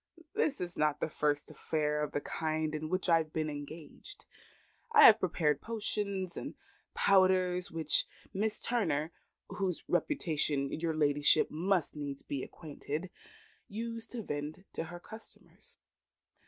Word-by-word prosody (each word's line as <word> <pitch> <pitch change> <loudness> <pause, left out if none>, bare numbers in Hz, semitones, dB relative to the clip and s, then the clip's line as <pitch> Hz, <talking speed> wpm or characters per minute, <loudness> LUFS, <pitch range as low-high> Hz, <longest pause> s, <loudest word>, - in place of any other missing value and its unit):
"This 365 -10 +1
is 175 -1 -4
not 150 -1 +1
the - - 0
first 145 -1 0
affair 150 -1 -1
of 150 - -2
the 145 - -1
kind 155 0 -2
in 155 0 -3
which 185 +2 0
I 165 -2 +6
have 155 -1 -4
been 155 -1 -1
engaged. 155 - -9 0.7
I 450 -1 +8
have 215 - +10
prepared 155 -5 +1
potions 205 -5 -2
and - - -6 0.4
powders 185 -2 +4
which 160 -2 +1 0.3
Mistress 210 +2 0
Turner 165 -10 +1 0.4
(with - - -9
whose 185 -4 -1
reputation 155 - 0
your 160 0 -1
ladyship 145 -1 +4
must 175 0 0
needs 140 -2 -5
be 140 -2 -3
acquainted) 155 +4 -6 0.6
used 230 +2 -5
to 235 -3 -4
vend 150 +4 -5
to - - -3
her 175 +2 -8
customers. 220 +5 -11
165 Hz, 140 wpm, -32 LUFS, 150-195 Hz, 0.7 s, have